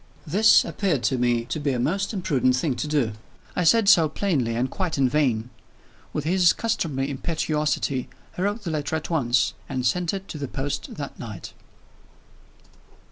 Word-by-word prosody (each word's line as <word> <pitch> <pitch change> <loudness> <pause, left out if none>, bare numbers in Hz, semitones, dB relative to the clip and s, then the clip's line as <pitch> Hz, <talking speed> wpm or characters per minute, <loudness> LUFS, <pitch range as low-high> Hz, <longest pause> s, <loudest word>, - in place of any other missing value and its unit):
This 205 +8 +5
appeared 175 - -1
to 130 -2 +1
me 120 -1 +1
to 155 - -3
be 145 -2 0
a 125 - -1
most 195 +10 0
imprudent 150 - +1
thing 130 0 0
to 135 - -2
do. 145 -7 +1 0.4
I 180 - +1
said 205 +5 +4
so 165 -5 +6
plainly 145 - 0
and 120 +3 0
quite 180 +3 -3
in 135 -2 +3
vain. 125 -4 0 0.6
With 150 - -3
his 175 +2 +4
customary 155 -12 -1
impetuosity, 150 -3 -1 0.3
he - - -4
wrote 205 +3 -1
the 170 - -3
letter 155 0 -2
at 160 +2 -4
once, 125 -6 +2 0.2
and 130 -2 -2
sent 170 +7 +1
it 195 0 -5
to 155 - -6
the 140 - -3
post 135 +2 -4
that 140 -2 -7
night. 110 -7 -8
150 Hz, 175 wpm, -24 LUFS, 130-175 Hz, 0.6 s, so